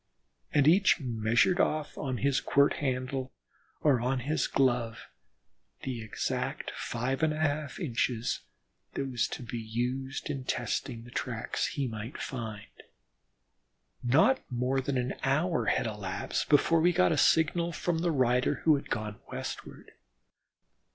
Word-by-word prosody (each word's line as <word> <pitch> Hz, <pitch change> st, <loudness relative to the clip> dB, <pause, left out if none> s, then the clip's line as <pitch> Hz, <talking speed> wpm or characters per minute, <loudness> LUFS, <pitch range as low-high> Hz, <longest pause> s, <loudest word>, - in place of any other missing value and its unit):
And 145 Hz, -1 st, +4 dB
each 185 Hz, +5 st, +5 dB
measured 120 Hz, -, +2 dB
off 155 Hz, -4 st, 0 dB
on 130 Hz, -3 st, -3 dB
his 140 Hz, +2 st, +1 dB
quirt 140 Hz, 0 st, +3 dB
handle, 130 Hz, -1 st, -2 dB, 0.5 s
or 135 Hz, -6 st, +3 dB
on 125 Hz, +1 st, 0 dB
his 150 Hz, +5 st, 0 dB
glove, 120 Hz, -4 st, 0 dB, 0.7 s
the 125 Hz, -3 st, -3 dB
exact 110 Hz, -1 st, -3 dB
five 125 Hz, +4 st, -2 dB
and 160 Hz, -1 st, +3 dB
a 155 Hz, -, -3 dB
half 150 Hz, -2 st, -1 dB
inches 120 Hz, -6 st, -1 dB, 0.6 s
that 135 Hz, -, -1 dB
was 125 Hz, -4 st, 0 dB
to -, -, -6 dB
be 120 Hz, 0 st, -5 dB
used 125 Hz, +4 st, -3 dB
in 140 Hz, -3 st, -3 dB
testing 120 Hz, -2 st, -2 dB
the 120 Hz, -, -13 dB
tracks 120 Hz, -3 st, -2 dB
he 140 Hz, -4 st, -2 dB
might 110 Hz, +2 st, -6 dB
find. 110 Hz, -5 st, -5 dB, 1.4 s
Not 155 Hz, -, +4 dB
more 125 Hz, +2 st, 0 dB
than 135 Hz, 0 st, -1 dB
an 125 Hz, +1 st, -1 dB
hour 155 Hz, +6 st, +1 dB
elapsed 105 Hz, -5 st, -2 dB
before 155 Hz, +3 st, +5 dB
we 175 Hz, +2 st, +4 dB
got 90 Hz, -, +4 dB
a -, -, +3 dB
signal 170 Hz, +2 st, +3 dB
from 165 Hz, +1 st, -1 dB
the 175 Hz, +1 st, +1 dB
rider 125 Hz, -4 st, +2 dB
who 155 Hz, -3 st, +5 dB
had -, -, -8 dB
gone 105 Hz, -1 st, -3 dB
westward. -, -, -7 dB
130 Hz, 140 wpm, -30 LUFS, 120-150 Hz, 1.4 s, each